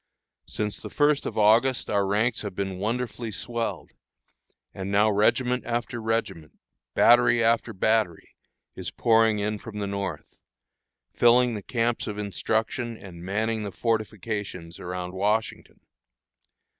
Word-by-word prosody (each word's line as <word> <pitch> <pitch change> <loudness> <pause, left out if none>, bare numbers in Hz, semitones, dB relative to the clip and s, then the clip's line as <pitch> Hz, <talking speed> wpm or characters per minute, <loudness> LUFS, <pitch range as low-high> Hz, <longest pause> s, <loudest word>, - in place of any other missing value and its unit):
Since 105 -1 -3
the - - -8
first 145 -1 +2
of - - -6
August 115 +5 +4
our 100 -1 +1
ranks 105 +4 +1
have 105 -3 -6
been 95 -2 -3
wonderfully 115 +1 -3
swelled; 115 -3 -4 0.8
and 95 0 -5
now 105 +2 +4
regiment 125 +4 +2
after 120 0 -3
regiment, 110 -8 -2 0.4
battery 120 -1 +5
after 115 0 +2
battery, 110 -3 0 0.5
is - - -5
pouring 115 -2 +3
in 105 +1 -2
from 110 -1 -9
the 105 - -2
North, 100 -6 -5 0.7
filling 120 0 +4
the 105 - -4
camps 115 +2 -1
of 105 -1 -4
instruction, 110 +3 -2
and 85 -5 -11
manning 110 +4 -1
the 105 -2 -4
fortifications 105 -5 -3
around 90 0 -5
Washington. 105 +4 -2
110 Hz, 130 wpm, -26 LUFS, 100-115 Hz, 0.8 s, battery